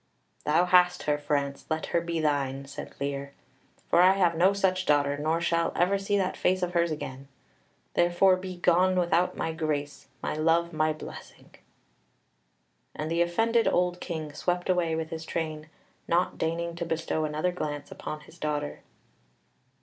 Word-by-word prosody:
"Thou 155 +4 +3
hast 180 0 +4
her, 150 -1 +1
France; 140 -1 -2
let 155 0 -1
her 170 - +3
be 170 -1 -2
thine," 140 -3 0
said 140 - -9
Lear, 140 0 -3 0.5
"for 170 - +4
I 185 +1 +7
have 180 -4 +2
no 180 +4 +5
such 185 -2 0
daughter, 145 -1 +3
nor 155 +3 0
shall 170 -1 +1
ever 195 +3 +2
see 205 +1 0
that 190 -1 0
face 185 0 +1
of 180 0 -2
hers 170 -1 +2
again. 140 -3 -6 0.7
Therefore 175 +2 +4
be 185 0 -7
gone 180 +1 +3
without 175 0 +1
my 165 - -1
grace, 150 -3 -3 0.2
my - - -1
love, 165 +2 +1
my 155 0 +2
blessing." 155 - -10 1.4
And 155 +1 -4
the 170 +1 +2
offended 225 +7 +2
old 180 0 +1
King 155 -5 -5
swept 175 +4 0
away 170 -3 +1
with 160 +1 -4
his 160 0 -5
train, 155 -1 -4 0.4
not 175 +2 +1
deigning 170 +1 -2
to 170 - -3
bestow 160 -1 -1
another 155 +4 0
glance 150 -4 -5
upon 155 0 -6
his 165 +3 -17
daughter. 150 -2 -2
165 Hz, 165 wpm, -28 LUFS, 150-180 Hz, 1.4 s, I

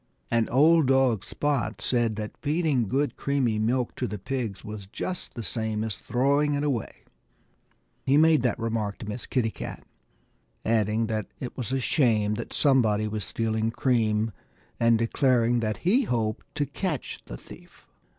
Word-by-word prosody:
And 115 -1 +2
old 155 +3 +5
dog 130 -6 +3
Spot 135 -7 -1
said 120 -3 +1
that 105 0 -5
feeding 150 - +1
good 135 +2 0
creamy 130 -6 0
milk 120 +3 0
to - - -1
the 105 - -4
pigs 110 -1 -4
was 105 -2 -7
just 180 - -5
the 115 - -5
same 110 0 -2
as 110 -3 -2
throwing 140 +7 +1
it 145 - -1
away. 135 -7 -2 1.0
He 135 +2 +3
made 160 -2 +5
that 125 -1 +1
remark 110 -3 -2
to - - -8
Miss 110 +3 -5
Kitty 120 -4 0
Cat, - - -7 0.8
adding 110 0 +2
that 110 -2 -2
it 125 - -6
was 125 -1 -4
a 135 - +1
shame 115 -7 +2
that 115 +2 -5
somebody 110 -7 +3
was 105 -1 -3
stealing 110 +1 -1
cream 115 -3 +1 0.5
and 115 -1 +4
declaring 120 0 +2
that 110 -2 -1
he 235 +8 +4
hoped 110 - -1
to 145 - +1
catch 150 +2 -3
the - - -7
thief. - - -15
115 Hz, 160 wpm, -27 LUFS, 110-135 Hz, 1.0 s, old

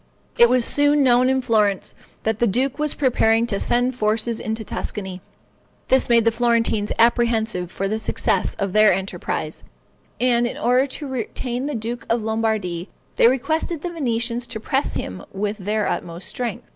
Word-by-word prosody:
It 235 - +6
was 250 -1 +2
soon 290 0 +3
known 250 0 +4
in 265 0 +1
Florence 210 -5 +1 0.3
that 220 -1 -1
the 240 - +3
duke 255 +7 0
was 300 -1 0
preparing 230 -4 +2
to 200 -4 -2
send 245 +2 +1
forces 220 0 0
into 220 0 -3
Tuscany. 190 -3 -5 0.7
This 260 -1 +3
made 235 -1 +4
the 230 - +4
Florentines 230 -2 +1
apprehensive 225 -6 +2
for 195 - -2
the 215 +2 -2
success - - 0
of 195 -2 -3
their 215 0 +6
enterprise; 190 +1 -3 0.6
and 240 -1 +2
in - - -6
order 250 +3 +2
to 285 +2 -6
retain 250 +1 -3
the 295 - -3
duke 230 +1 -5
in 230 -1 0
Lombardy, 215 -6 -1 0.3
they - - +6
requested 315 +5 0
the 355 - -3
Venetians 240 -5 -1
to 220 - -5
press 270 +5 -1
him - - -5
with 205 +2 -2
their 210 +2 -1
utmost 170 +1 -4
strength. 240 -4 -4
230 Hz, 170 wpm, -22 LUFS, 215-250 Hz, 0.7 s, It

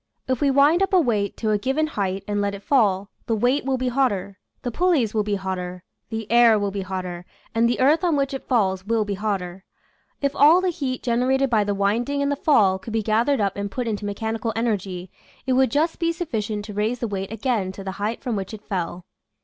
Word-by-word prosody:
If 260 -2 -1
we 285 - +3
wind 285 +6 +4
up 390 0 +1
a 370 - +7
weight 215 - 0
to 220 -2 0
a 210 - +2
given 270 +7 0
height 195 -9 -2
and 205 0 0
let 200 0 -1
it 200 - -11
fall, 205 -7 +2 0.2
the 225 - +1
weight 245 +6 +1
will 265 -1 +1
be 255 0 -1
hotter, 205 -7 0 0.2
the 245 - -2
pulleys 305 - +2
will 215 - +2
be 205 0 -1
hotter, 180 -2 -4 0.3
the 225 -1 -4
air 235 -2 +6
will 205 -1 -1
be 200 0 -3
hotter, 185 -2 -5 0.3
and 230 +1 +3
the 240 - -1
earth 295 +6 +4
on 340 -4 +2
which 275 -1 0
it 270 - -6
falls 190 -7 +1
will 220 +1 0
be 205 - -2
hotter. 190 -3 -3 0.6
If 280 -1 -1
all 305 +5 +7
the 370 0 +1
heat 270 -6 -4
generated 255 +2 +1
by 215 -2 +3
the 205 0 -1
winding 235 +8 0
and 280 - 0
the - - +1
fall 205 -11 +3
could 215 +4 -8
be 225 -1 0
gathered 230 +6 +2
up 200 -2 0
and 200 0 -3
put 245 +4 -3
into 210 -2 -3
mechanical 220 +2 -2
energy 195 -6 -2 0.3
it 260 - +1
would 260 +1 +4
just 315 +3 0
be 335 0 +1
sufficient 220 - -3
to 210 - -8
raise 215 +4 0
the 235 - -3
weight 195 -1 -4
again 225 -4 -1
to 195 - -8
the 190 - -4
height 220 +3 -2
from 245 -3 -1
which 195 +2 -4
it 210 - -13
fell. 180 -3 -4
220 Hz, 235 wpm, -23 LUFS, 200-265 Hz, 0.6 s, a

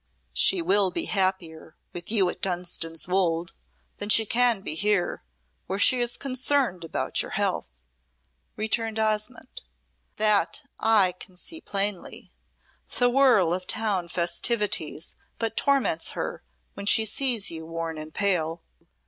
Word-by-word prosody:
"She 170 - +4
will 195 +2 +3
be 180 - -2
happier 185 -5 -2 0.2
with 175 0 -6
you 200 -5 +3
at - - -11
Dunstan's 175 -3 -3
Wolde 175 -2 0 0.5
than 205 - -3
she 220 +1 +6
can 235 -2 +2
be 190 - -3
here, 205 +2 0 0.5
where 190 - -2
she 250 +5 +5
is 240 0 -1
concerned 255 -7 -1
about 165 - -2
your - - -6
health," - - -1 0.9
returned 220 +1 -1
Osmonde. 220 - -2 0.5
"That 215 +6 +2 0.2
I 215 -5 +4
can 185 +1 -13
see 325 - -9
plainly. 200 -2 -4 0.7
The 245 0 +3
whirl 240 -10 +4
of 180 0 -4
town 205 -5 0
festivities 170 -1 0 0.2
but 225 -1 -2
torments 270 - +1
her - - -4 0.3
when 200 - -7
she 220 +1 +6
sees 230 -2 +2
you 160 -1 -7
worn 165 -1 -5
and 155 0 -8
pale." 170 -4 -1
195 Hz, 135 wpm, -26 LUFS, 175-225 Hz, 0.9 s, she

